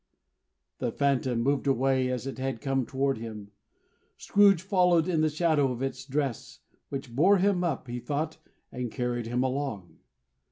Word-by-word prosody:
The - - -1
Phantom 135 -4 +1
moved 140 +4 0
away 130 -1 +2
as 125 0 -3
it 135 -1 -6
had 130 -2 -2
come 135 -3 -1
toward 135 -2 0
him. 105 -3 -8 0.7
Scrooge 200 -4 +4
followed 180 -4 +3
in 165 -4 +1
the 155 - +3
shadow 155 -3 +2
of 125 +1 -4
its 130 -1 -4
dress, 140 -4 -3 0.3
which 135 -4 -6
bore 190 +9 +5
him 190 -1 +2
up, 155 -6 -2
he 120 0 -4
thought, 145 +5 -3 0.3
and 125 -2 -4
carried 120 -2 -2
him 125 +2 0
along. 130 -9 -3
135 Hz, 160 wpm, -28 LUFS, 125-155 Hz, 0.7 s, bore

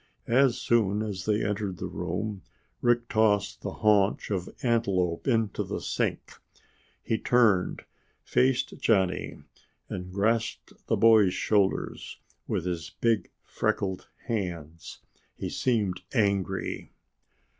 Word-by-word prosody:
As 125 +1 +3
soon 110 -3 +1
as 95 -4 -5
they 105 0 +1
entered 105 -3 -2
the - - -5
room, 105 -2 -4 0.4
Rick 120 0 +2
tossed 110 -3 +1
the - - -3 0.2
haunch 105 -1 +3
of 90 -3 -2
antelope 100 -8 +1
into 115 -5 +1
the - - -4
sink. - - -3 0.6
He 110 - -1
turned, 110 -7 +2 0.4
faced 130 0 +1
Johnny, 95 -5 +1 0.5
and 90 0 -6
grasped 110 +4 -1
the - - +2
boy's 110 -5 +5
shoulders 100 -3 0 0.3
with - - -1
his 85 -3 -3
big 115 -3 +1
freckled 95 -2 -2 0.2
hands. 85 -8 -5 0.3
He - - -4
seemed 105 -8 0
angry. 100 - -1
105 Hz, 115 wpm, -28 LUFS, 95-115 Hz, 0.6 s, boy's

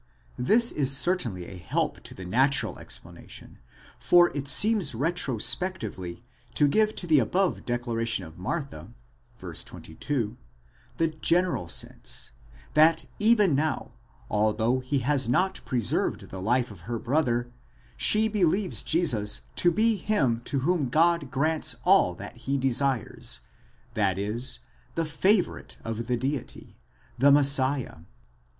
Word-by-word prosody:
This 230 - +3
is 135 -2 +2
certainly 125 - 0
a 90 - -10
help 85 - -2
to - - -8
the 95 - -9
natural 130 +9 +1
explanation, - - -8 0.4
for 175 -2 +4
it 140 -1 -4
seems 205 - +3
retro 140 -2 -1
spectively 105 - -3 0.3
to 145 - +4
give 215 +8 +2
to - - -4
the 155 -4 +4
above 180 - 0
declaration 115 -4 -2
of 80 +2 -13
Martha 115 - -5 0.4
(v. 90 -6 -9
22) 110 - -5 0.6
the 165 -1 +1
general 165 - 0
sense, - - -3 0.4
that 160 +1 +4
even 210 -5 +4
now, 155 +3 -2 0.3
although 110 +4 +1
he 130 +2 -2
has 135 -4 +2
not 190 +9 0
preserved 120 -5 0
the 95 - -7
life 120 +4 0
of 95 +1 -13
her 120 - -2
brother, 120 -2 -1 0.4
she 215 +1 +3
believes 195 -2 0
Jesus 110 -11 +2 0.2
to 175 - +4
be 220 +5 +2
him 135 - 0
to 135 0 -1
whom 155 -3 0
God 165 0 +2
grants 155 +3 0
all 180 - +4
that 100 +5 -10
he 135 +3 -2
desires, 135 -2 -1 0.5
that 100 -3 0
is, 110 +6 0 0.3
the 165 - -1
favourite 185 +6 0
of 115 0 -5
the 125 - 0
Deity, 135 +2 -5 0.4
the 140 +2 +5
Messiah. 140 - +4
135 Hz, 130 wpm, -26 LUFS, 115-170 Hz, 0.6 s, the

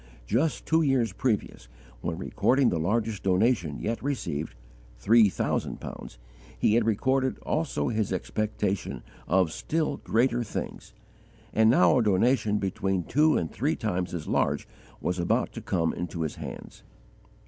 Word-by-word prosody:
Just 135 - 0
two 160 +1 +3
years 130 - +2
previous, 105 - -2 0.3
when 85 -1 -3
recording 125 +8 +2
the 85 - -1
largest 105 +4 -1
donation 95 - +1
yet 115 +1 -3
received, 85 - -3 0.4
three 110 - +5
thousand - - -2
pounds, - - -9 0.4
he 105 - +2
had 115 0 +3
recorded 130 +4 +1
also 155 -4 -1
his 110 -4 -1
expectation 100 - -2 0.2
of 90 +1 +2
still 160 - -1
greater 120 +1 +1
things; 110 - -6 0.6
and 110 0 +5
now 90 -1 +5
a - - +2
donation 105 +1 +2
between 95 -2 -1
two 150 - +3
and 80 - -2
three - - 0
times 90 0 -2
as 80 - -5
large - - 0 0.3
was 90 0 -1
about 85 - +1
to - - -7
come 85 -3 0
into 85 -1 -4
his 80 - -3
hands. - - -8
105 Hz, 145 wpm, -27 LUFS, 90-120 Hz, 0.6 s, three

